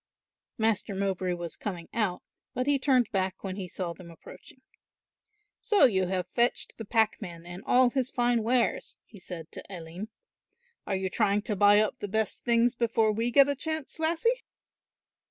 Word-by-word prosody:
Master 220 -3 0
Mowbray 190 -2 -1
was 170 -2 -6
coming 175 -5 -5
out, 210 -6 -1 0.3
but 255 0 0
he 285 0 +2
turned 255 -4 +2
back 190 -2 -2
when 190 -2 -4
he 190 -2 -5
saw 175 -1 -4
them 170 +1 -13
approaching. 170 +9 -14 1.0
"So 415 - +5
you 190 -7 +2
have 185 -1 -1
fetched 235 +6 -1
the 225 - -5
packman 205 -6 -1
and 175 +2 -8
all 250 0 +5
his 260 -1 -1
fine 240 -2 +1
wares," 235 +2 0
he 210 - -15
said 170 -3 -8
to - - -8
Aline. 175 +2 -7 0.8
"Are 195 - 0
you 190 -1 -2
trying 205 -1 +1
to 210 - -2
buy 205 +1 +6
up 215 - 0
the 205 - -4
best 220 +2 -2
things 235 0 +3
before 230 -2 +2
we 225 +3 0
get 275 +2 +6
a 285 - +2
chance, 315 +2 -5
lassie?" 340 +10 +1
215 Hz, 170 wpm, -28 LUFS, 185-245 Hz, 1.0 s, buy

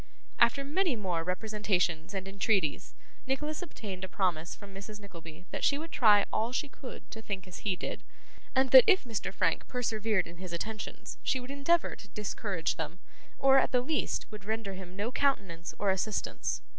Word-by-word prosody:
After 235 +4 +5
many 320 +1 +1
more 180 -6 -1
representations 185 -3 0
and 190 0 -3
entreaties, 195 -4 0 0.3
Nicholas 300 +4 -1
obtained 205 - -6
a 190 - -4
promise 175 -4 0
from 200 -1 -12
Mrs. 210 +2 -8
Nickleby 170 -4 -11
that - - -4
she 280 - +4
would 325 +2 -6
try 210 -4 +6
all 225 +2 +1
she 275 +3 -1
could 270 -2 -10
to 225 - -6
think 195 -3 -4
as 180 - -8
he 200 -3 0
did; - - -5 0.5
and 265 0 +3
that 260 -2 +11
if 375 - +6
Mr. 230 -5 -3
Frank - - +1
persevered 220 -5 0
in 170 0 -11
his 180 -1 -7
attentions 215 +4 -5
she 260 - +1
would 250 +2 -7
endeavour 280 +5 +2
to 200 - -13
discourage 200 -3 -2
them, 165 +2 -4 0.4
or, 270 0 +6
at - - +1
the 250 -2 +4
least, 295 +4 -1
would 210 -2 -8
render 220 -1 -2
him 185 -1 -9
no 210 +5 -2
countenance 195 -13 0
or 200 -2 +2
assistance. 190 +3 -1
210 Hz, 180 wpm, -31 LUFS, 185-255 Hz, 0.5 s, that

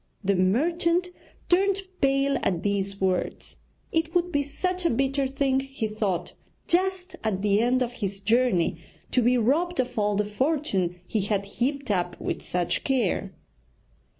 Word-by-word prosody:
The 200 +1 +2
merchant 335 - +2 0.4
turned 390 +2 +2 0.2
pale 275 0 +2
at 175 -4 0
these 200 -1 -1
words. 185 -1 -2 0.3
It 325 +1 0
would 355 0 +2
be 285 -3 +2
such 360 +6 -2
a 335 - +3
bitter 270 +2 +1
thing, 270 0 +1
he 270 -4 -3
thought, 210 -4 -2 0.3
just 370 +1 0
at 200 -3 -1
the 205 0 +3
end 250 +3 +3
of 240 - -3
his 200 -5 -4
journey 225 -4 +2 0.3
to 250 - +3
be 245 +2 +3
robbed 320 +10 +1
of 250 -3 -1
all 205 0 +1
the 210 +1 +1
fortune 210 - 0
he 215 +3 -1
had 200 0 -1
heaped 260 +5 -2
up 180 -2 -1
with - - -3
such 175 -1 -1
care. 265 -3 0
250 Hz, 155 wpm, -26 LUFS, 200-300 Hz, 0.4 s, a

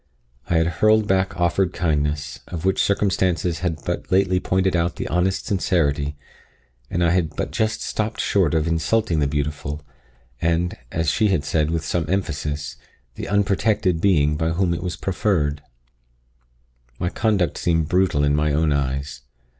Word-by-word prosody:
I 85 - +1
had 80 - +3 0.2
hurled 110 0 +4
back 95 -1 0
offered 85 +1 +1
kindness, 75 -3 -1
of 85 0 -5
which 95 - +2
circumstances 90 -4 +1
had 90 -4 -3
but - - -3
lately 95 -1 +3
pointed 95 0 +1
out 85 0 0
the - - -4
honest 90 +2 0
sincerity, 75 -7 0 0.7
and 85 - 0
I 85 - +3
had 85 -3 0
but - - -3
just 110 0 -1
stopped 110 0 -2
short 90 -6 +2
of 80 0 +1
insulting 85 +2 +1
the 70 - +2
beautiful, 75 +1 -3 0.6
and, 85 +1 +1 0.2
as 80 0 0
she 110 - +2
had 90 -8 0
said 75 +1 +1
with 80 -1 -2
some 80 -3 -1
emphasis, 75 -7 -2 0.4
the - - -6
unprotected 100 -3 +1
being 75 -6 +3
by 80 +1 0
whom 90 0 +1
it 85 - -3
was 90 -2 -3
proffered. 90 -7 0 1.4
My 90 - -1
conduct 100 -6 0
seemed 80 -3 +1
brutal 90 -4 +2
in 70 0 +3
my 75 0 +1
own 75 0 +2
eyes. 70 0 -2
85 Hz, 160 wpm, -22 LUFS, 75-95 Hz, 1.4 s, hurled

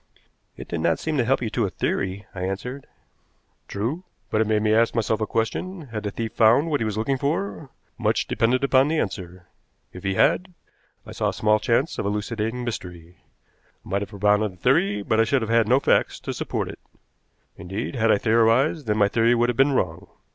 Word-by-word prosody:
"It - - -9
did 85 - -3
not 80 0 +1
seem 160 -1 -3
to 125 - +3
help 130 +1 +1
you 110 - -3
to 115 -2 0
a - - -4
theory," 95 +1 -2
I 95 - -6
answered. 110 +9 -4 0.8
"True. 120 - -3 0.3
But 110 - +2
it 110 - +1
made 105 -1 +1
me 110 0 +3
ask 115 +1 +3
myself 110 -1 0
a 110 - 0
question. 150 - -3
Had 110 -2 -4
the 105 - -3
thief 110 +2 -5
found 120 +9 +4
what 145 - 0
he - - +1
was 110 -1 -3
looking 130 +5 0
for? 155 0 -2 0.3
Much - - +1
depended 125 +4 +1
upon 135 0 +4
the 160 +2 0
answer. 90 - -4 0.5
If 90 - -10
he 95 0 -1
had, 180 - +2 0.5
I - - -10
saw - - -1
small 110 0 +2
chance 130 +9 0
of - - -1
elucidating 110 +3 -2
the - - -5
mystery. 90 -6 -7 0.7
I - - -12
might 100 +2 0
have 100 - -5
propounded 105 0 +1
a - - -17
theory, 100 +3 +1
but 110 +2 +1
I - - +6
should 120 +2 +1
have 110 - -3
had 115 -2 +3
no 130 +4 +4
facts - - +1
to - - -4
support - - -3
it. - - -9 0.8
"Indeed, 95 +9 -5
had 115 -3 +2
I - - +4
theorized, 115 +7 +2
then 105 0 +1
my 100 -2 +4
theory 115 +3 +3
would 120 +1 +2
have 120 - -1
been 135 +3 +3
wrong. 85 -10 -1
110 Hz, 215 wpm, -24 LUFS, 100-125 Hz, 0.8 s, I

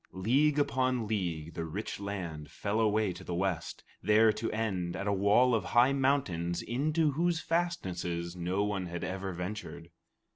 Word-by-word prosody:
League 135 +11 +2
upon 130 -4 +1
league, 85 -7 -2
the 85 - -3
rich 90 +8 -5
land 90 -7 -5
fell 105 +2 -2
away 105 -3 +2
to - - -10
the 85 - -4
west, 95 -2 -2 0.2
there 110 +2 +5
to 115 - -3
end 95 -6 -2
at - - -4
a 100 - +1
wall 105 +6 +4
of 110 -4 +2
high 120 +8 +4
mountains 115 -12 0
into 150 +6 +1
whose 170 +3 +1
fastnesses 90 - -2
no 90 +3 -1
one 100 -3 -2
had 85 0 -5
ever 95 +1 -3
ventured. 90 -2 -6
100 Hz, 160 wpm, -31 LUFS, 90-125 Hz, 0.2 s, there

